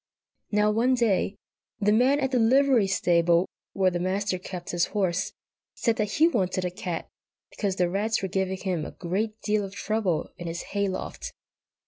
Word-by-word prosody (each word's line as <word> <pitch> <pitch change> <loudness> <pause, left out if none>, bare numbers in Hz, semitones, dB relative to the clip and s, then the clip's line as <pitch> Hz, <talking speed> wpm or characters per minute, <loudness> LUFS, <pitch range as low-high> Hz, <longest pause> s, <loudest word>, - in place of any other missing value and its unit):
Now, 210 0 +3
one 240 +4 +3
day, 215 -4 +1 0.4
the 210 -1 +3
man 255 +6 +4
at 265 -2 0
the 255 - +2
livery 250 -2 +4
stable, 175 -2 +3 0.3
where 190 -1 +2
the 175 - -2
Master 185 +1 -1
kept 180 -1 -6
his 175 0 +2
horse, 185 -1 0 0.4
said 230 -2 +1
that 215 -1 -1
he 320 - +5
wanted 185 - 0
a 180 - -1
cat, 180 -3 -4 0.4
because 200 -3 -2
the 180 -1 +2
rats 205 +4 0
were - - 0
giving 190 0 -1
him 185 -4 -2
a - - -5
great 210 +5 -2
deal 210 -1 +1
of 195 0 -7
trouble 210 -8 -1
in 175 - -5
his 170 +1 -4
hay 200 -1 +1
loft. 185 - -5
195 Hz, 180 wpm, -26 LUFS, 180-220 Hz, 0.4 s, he